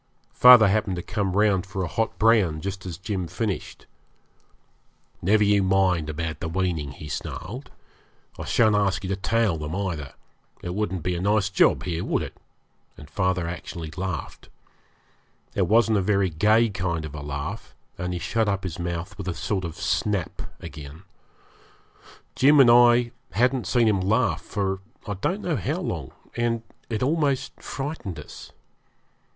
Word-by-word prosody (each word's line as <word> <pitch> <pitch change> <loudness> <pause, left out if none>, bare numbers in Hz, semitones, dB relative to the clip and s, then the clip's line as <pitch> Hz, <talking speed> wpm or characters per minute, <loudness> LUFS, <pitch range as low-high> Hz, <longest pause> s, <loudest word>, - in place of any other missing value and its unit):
Father 125 -3 +9
happened 100 -1 +1
to 90 - -5
come 100 -3 -2
round 105 -3 +3
for 95 0 -3
a - - -2
hot 115 +4 -2
brand 105 -9 +3
just 95 -1 -5
as 85 -4 -5
Jim 95 -2 -3
finished. 95 +4 -4 1.4
'Never 105 +4 +3
you 100 -1 +4
mind 95 -4 +2
about 80 +1 -4
the 80 - -4
weaning,' 80 -5 -1
he 75 - -9
snarled. 120 - -6 0.7
'I - - -5
shan't 110 -2 +3
ask 100 -2 +1
you 95 - -4
to 100 - 0
tail 110 -2 +1
them 75 +2 -4
either. 85 -9 -3 0.5
It 90 - -3
wouldn't 95 -4 -2
be 90 - 0
a 85 - -3
nice 100 -1 +2
job 95 - +3
here, 85 -1 -2
would - - 0
it?' - - -8 0.6
and 75 0 -13
father 95 -3 0
actually 85 -2 -6
laughed. 95 -4 -5 1.0
It 95 -3 +1
wasn't 110 0 +4
a - - +1
very 100 -1 +1
gay 110 +8 +3
kind 90 -5 -2
of 75 - -8
a 75 - -6
laugh, 70 0 -6 0.2
and 90 0 -4
he 90 - -2
shut 110 +4 0
up 100 -1 -1
his 90 -3 -5
mouth 85 +3 -4
with 95 - -5
a 90 - -2
sort 95 -3 -2
of 85 -2 -5
snap 100 -6 -1 0.2
again. 75 +3 -10 1.3
Jim 145 +2 +5
and 125 -3 +8
I 120 0 +6 0.2
hadn't 125 -2 +1
seen 115 +4 +3
him 100 -3 +2
laugh 110 +6 +1
for 95 -2 -2 0.3
I 105 - -3
don't 175 - -2
know 165 -5 0
how 100 - -2
long, - - -4 0.3
and 115 -1 0 0.3
it 110 0 -1
almost 145 -2 0
frightened 135 - -5
us. 75 - -11
95 Hz, 165 wpm, -25 LUFS, 85-110 Hz, 1.4 s, Father